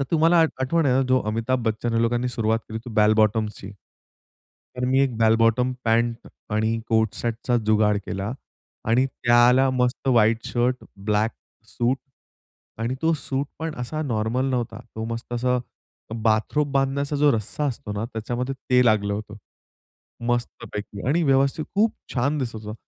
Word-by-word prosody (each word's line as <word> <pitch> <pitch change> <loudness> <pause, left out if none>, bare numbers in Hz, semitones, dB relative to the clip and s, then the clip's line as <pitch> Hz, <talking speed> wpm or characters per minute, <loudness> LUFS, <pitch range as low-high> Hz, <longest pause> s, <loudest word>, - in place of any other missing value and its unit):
तर 140 - +1
तुम्हाला 165 +1 +4
आठ 160 - +3
आठवण 155 +4 +1
आहे 125 - +3
ना, 135 - +3
जो 130 0 +4
अमिताभ 115 +4 0
बच्चन 110 +1 -1
ह्या 115 - +2
लोकांनी 120 +2 +1
सुरुवात 115 -2 0
केली, 110 0 -4
ते 120 +1 -10
बॅल 105 -1 +5
बॉटमची. 110 -2 0 1.1
तर 125 - -1
मी 130 +1 +3
एक 130 -4 +1
बॅल 110 0 +5
बॉटम 115 +3 +2
पँट 115 +1 +1 0.3
आणि 110 +1 +1
कोट 110 -2 +2
सेटचा 120 +1 -1
जुगाड 105 -1 +3
केला 100 +3 -3 0.6
आणि 125 +4 +3
त्याला 125 +1 +4
मस्त 125 +1 0
व्हाइट 115 -1 +3
शर्ट, 125 +1 +1 0.2
ब्लैक 105 +2 0 0.4
सूट 120 +2 0 0.9
आणि 120 +3 -1
तो 165 +1 +3
सूट 140 -2 -2
पण 160 -1 -3
असा 155 +6 -3
नॉर्मल 120 +1 -1
नव्हता. 120 -2 -2 0.2
तो 110 0 -3
मस्त 115 +1 -5
असा 125 +1 +1 0.7
बाथरोब 115 +7 +1
बांधण्याचा 140 +1 0
जो 145 0 +4
रस्सा 115 +6 -2
असतो 120 -5 -4
ना, 105 +2 -2
त्याच्यामध्ये 120 +3 -4
ते 125 0 +5
लागलं 100 -2 +2
होतं. 105 +1 -6 0.9
मस्तपैकी 105 -3 -3
आणि 160 +6 +2
व्यवस्थित 140 +2 +2
खूप 215 +2 +3 0.2
छान 140 +4 +1
दिसत 120 -5 -3
होतं. 105 0 -7
120 Hz, 160 wpm, -24 LUFS, 110-135 Hz, 1.1 s, बॅल